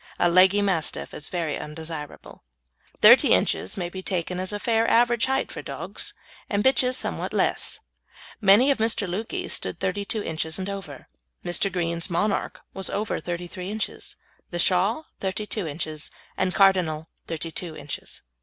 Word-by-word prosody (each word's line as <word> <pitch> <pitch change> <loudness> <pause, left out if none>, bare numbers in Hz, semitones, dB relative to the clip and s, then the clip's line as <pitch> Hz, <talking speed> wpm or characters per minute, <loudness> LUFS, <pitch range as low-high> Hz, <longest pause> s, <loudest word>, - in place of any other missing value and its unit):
A 175 - +3
leggy 190 +3 +6
Mastiff 180 -6 0
is 145 - -5
very 165 -4 -2
undesirable. 150 0 -8 0.6
Thirty - - +8
inches 95 - +1
may 175 -2 -2
be 185 +2 -7
taken 180 -1 -2
as 185 +1 -1
a 205 - -2
fair 225 +1 +1
average 240 0 +3
height 265 0 0
for - - -6
dogs, - - -4 0.3
and 205 0 +1
bitches 255 -1 +4
somewhat - - -3
less. - - 0 0.6
Many 210 +7 +6
of 270 - 0
Mr. 220 -2 +2
Lukey's 225 - -3
stood - - -3
32 205 +3 -2
inches 160 0 -1
and 190 +1 -3
over; 190 -9 -8 0.4
Mr. 175 +3 +1
Green's 170 -1 -1
Monarch 195 +4 -1
was 190 -1 -2
over 210 +1 -2
33 175 +1 -5
inches, 215 +1 -4 0.3
The 175 - -4
Shah 190 - +3 0.2
32 200 0 -2
inches, 155 0 -4 0.3
and 185 -1 0
Cardinal 180 -6 +3 0.2
32 165 0 -5
inches. 145 -1 -6
185 Hz, 150 wpm, -25 LUFS, 165-210 Hz, 0.6 s, Thirty